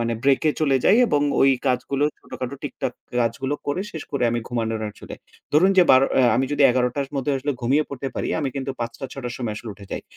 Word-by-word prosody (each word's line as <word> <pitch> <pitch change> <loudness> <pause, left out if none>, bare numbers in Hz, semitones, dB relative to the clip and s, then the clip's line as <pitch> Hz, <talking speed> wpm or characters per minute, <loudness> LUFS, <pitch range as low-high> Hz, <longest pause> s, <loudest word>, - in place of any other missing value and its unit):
মানে 115 0 0
ব্রেক 140 +1 +3 0.2
চলে 140 -3 +3
যাই। 205 - +6
এবং 145 - +1 0.2
ওই 135 - +6 0.2
কাজগুলো 135 +2 0
ছোটখাটো 130 +1 -6
টিকটাক 135 -3 -4 0.3
কাজগুলো 130 +5 -1
করে 145 +6 -1
শেষ 160 - -6
করে 135 -3 0
আমি 120 - -1
ঘুমানোর 115 -2 -2
আসলে। - - -10 0.4
ধরুন, 180 +6 +5
যে - - +9
১২ঃ০০ 130 +1 +6
অ্যা 130 -2 +5
আমি 130 - +2
যদি 145 0 +2
১১ঃ০০ 125 0 +2
টার 140 -1 -1
মধ্যে 135 +2 0
আসলে 145 +2 -2
ঘুমিয়ে 140 +6 +2
পড়তে 140 -1 -5
পারি - - -2
আমি 140 - -1
কিন্তু 135 0 -3
৫ঃ০০ 120 0 -3
টা - - -4
৬ঃ০০ 135 - -8
টার 120 0 -4
সময় 115 -4 -3
আসলে 115 - -8
উঠে 100 - -13
যাই। - - -4
135 Hz, 230 wpm, -23 LUFS, 120-140 Hz, 0.4 s, যে